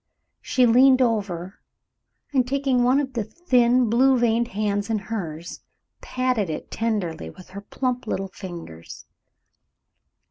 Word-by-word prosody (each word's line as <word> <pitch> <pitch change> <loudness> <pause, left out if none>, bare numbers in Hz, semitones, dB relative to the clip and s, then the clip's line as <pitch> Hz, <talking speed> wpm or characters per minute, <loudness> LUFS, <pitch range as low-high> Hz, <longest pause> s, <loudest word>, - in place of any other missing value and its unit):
She 255 - +2
leaned 255 +3 +6
over, 200 -7 -1 0.7
and 255 -3 +2
taking 270 -2 +1
one 255 +3 +4
of 265 -2 -3
the 235 -3 -1
thin, 250 - +2
blue 255 +4 +4
veined 235 0 +2
hands 205 0 -2
in 225 - +1
hers, 180 -5 -6 0.4
patted 255 -7 -1
it 155 - -6
tenderly 195 - -2
with 180 - -14
her 200 +2 -8
plump 250 +3 -3
little 195 -2 -3
fingers. 170 - -10
225 Hz, 130 wpm, -23 LUFS, 195-255 Hz, 0.7 s, leaned